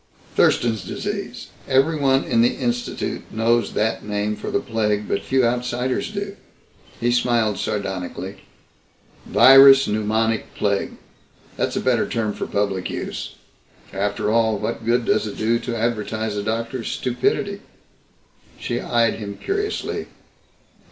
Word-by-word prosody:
"Thurston's 110 -4 +2
Disease. - - -5 0.2
Everyone 135 0 +3
in 115 - +2
the 120 - +3
Institute 120 -1 -2
knows 115 +2 +1
that 110 +1 0
name 105 0 -2
for - - -6
the - - +1
plague, 105 -5 -1
but 100 - -1
few 130 +4 +2
outsiders 125 +1 -1
do." 200 -1 -5 0.6
He 120 +1 +1
smiled 120 -4 +1
sardonically. 95 -4 -4 0.9
"Virus 135 0 +8
pneumonic 110 +1 0
plague 100 -1 -1 0.6
that's - - -1
a - - +1
better - - +1
term 110 -3 -1
for - - -5
public 100 -2 -1
use. - - -5 0.6
After 100 +2 -1
all, 110 -1 +2
what 110 - -4
good 120 0 +2
does - - +1
it 105 - -7
do 115 +2 +1
to 120 -1 -4
advertise 110 -1 -2
a 105 - -1
doctor's 115 +3 -3
stupidity?" 125 -1 -1 1.0
She 120 - -3
eyed 115 -2 +1
him 100 -2 -6
curiously. 410 +1 -3
115 Hz, 130 wpm, -22 LUFS, 105-125 Hz, 1.0 s, Virus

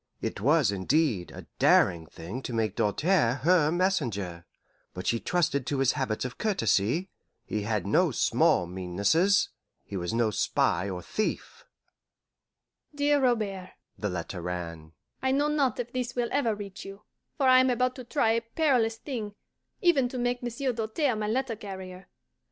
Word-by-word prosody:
It - - -4
was, 140 -2 +3
indeed, 100 - +1
a - - -10
daring 85 -3 +4
thing 95 - -7
to 125 - -6
make 110 -3 0
Doltaire 130 - +2
her 165 -2 +4
messenger. 115 - -1 0.5
But 90 - -6
she 115 - +1
trusted 140 -6 0
to 145 - -1
his 135 -1 +3
habits 130 -5 -2
of 125 - -7
courtesy; 155 - +1 0.3
he 105 - -2
had 105 -2 -1
no - - +3
small 90 - +2
meannesses 100 - +1 0.4
he 100 - -8
was 85 -2 -2
no 115 -1 +1
spy 90 -2 +1
or 90 -2 -5
thief. 215 - -3 1.3
DEAR 290 0 +3
ROBERT 210 -7 0 0.2
(the 105 - -3
letter 90 0 -5
ran): 85 -3 -6 0.3
I 265 - +1
know 290 +2 +2
not 280 -6 +1
if 240 0 -4
this 250 -1 -3
will 240 -1 0
ever 235 -6 +1
reach 200 -2 -8
you, 195 +1 -10 0.3
for 275 -3 +2
I 255 0 +7
am 255 0 +4
about 250 +1 +1
to 255 - -7
try 240 -1 +1
a 230 +1 +1
perilous 230 -2 +1
thing, 220 -7 -5 0.5
even 295 - +3
to 255 - -6
make 245 0 -1
Monsieur 245 +2 -2
Doltaire 230 +4 0
my 210 -1 -2
letter 245 +1 -1
carrier. 190 -3 -9
185 Hz, 165 wpm, -28 LUFS, -, 1.3 s, I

